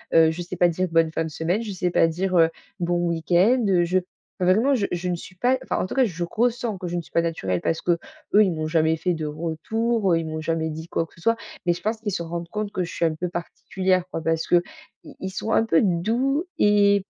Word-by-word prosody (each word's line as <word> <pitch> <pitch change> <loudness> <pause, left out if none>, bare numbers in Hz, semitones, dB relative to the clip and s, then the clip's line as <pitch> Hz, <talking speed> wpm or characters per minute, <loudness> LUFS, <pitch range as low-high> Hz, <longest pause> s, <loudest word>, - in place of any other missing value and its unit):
Heu, 160 -1 +6
je 175 - -5
sais 180 +1 -6
pas 175 0 +4
dire 180 +2 -1
«bonne 165 -1 +3
fin 165 - -1
de 160 - -4
semaine», 165 +7 -1
je 215 - -5
sais 180 -1 -1
pas 165 - +4
dire, 185 +3 -1
heu, 165 0 +6 0.3
«bon 175 0 0
week-end». 180 +9 +3
Heu, 180 -3 +3
je 185 +2 +2 0.4
vraiment 205 +10 +3
je 205 -5 0
je 175 +1 -2
ne 175 - 0
suis 185 +2 -11
pas 250 +7 +2
enfin, - - -2
en - - 0
tout - - -6
cas 265 - +4
je 175 -4 -3
ressens 235 -2 0
que 180 - -5
je 175 - -3
ne - - -1
suis - - -18
pas 170 - +3
naturelle, 95 - -2
parce 165 - -1
qu'eux 170 -1 +1 0.4
ils 190 - +1
m'ont 155 -1 -3
jamais 160 0 +2
fait 180 +2 0
de 160 -2 -4
retour. 185 +6 0
Ils 165 - -2
m'ont 155 0 -4
jamais 160 0 -1
dit 160 +2 -7
quoi 165 - -1
que - - -24
ce 170 - -18
soit. 230 +4 +2 0.3
Mais 175 - +3
je 175 - -9
pense 220 +1 -2
qu'ils 210 -2 -2
se 170 - -2
rendent 170 0 -5
compte 210 -1 -3
que 185 - -1
je 170 - -6
suis 170 - 0
un 160 - +1
peu 180 +3 -3
particulière 185 +2 -1
quoi. 165 - -4
Parce 165 0 0
qu'ils 175 - +5 0.6
ils 190 - -4
sont 195 +4 -4
un - - +4
peu 165 -8 +3
doux 235 - +1
et 200 -1 +4
175 Hz, 260 wpm, -24 LUFS, 165-200 Hz, 0.6 s, Heu